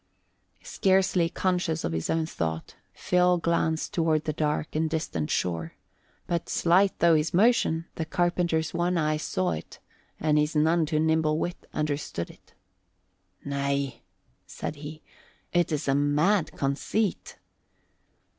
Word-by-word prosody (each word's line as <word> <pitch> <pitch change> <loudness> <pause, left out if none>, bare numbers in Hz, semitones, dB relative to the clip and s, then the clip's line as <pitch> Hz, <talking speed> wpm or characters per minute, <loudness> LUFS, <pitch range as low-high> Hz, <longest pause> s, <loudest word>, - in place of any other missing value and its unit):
Scarcely 190 -3 +2
conscious 175 -3 -1
of - - -1
his 80 0 -3
own 160 -1 +1
thought, 80 - -4 0.2
Phil 180 0 +2
glanced 165 -1 0
toward 160 -2 +1
the 155 - -2
dark 150 0 -2
and 160 +1 +1
distant 115 - -2
shore; 85 -2 -2 0.5
but, 170 -1 -2
slight 185 +3 +3
though 170 -1 +5
his 155 +2 +1
motion, 185 -6 +3
the 160 - -2
carpenter's 175 -1 0
one 175 +1 0
eye 155 -1 +1
saw 95 - -1
it 80 0 -6 0.4
and 150 -1 +2
his 150 +2 0
none 160 +1 +3
too 155 -1 0
nimble 160 -1 +2
wit 175 +2 -4
understood 145 - -3
it. - - -24 0.9
"Nay," 140 -1 -2 0.5
said - - -5
he, 155 +2 -9 0.5
"it 175 -1 +2
is 150 -1 -2
a 135 - +3
mad 150 +5 +2
conceit." 150 +9 -2
160 Hz, 135 wpm, -27 LUFS, 145-170 Hz, 0.9 s, though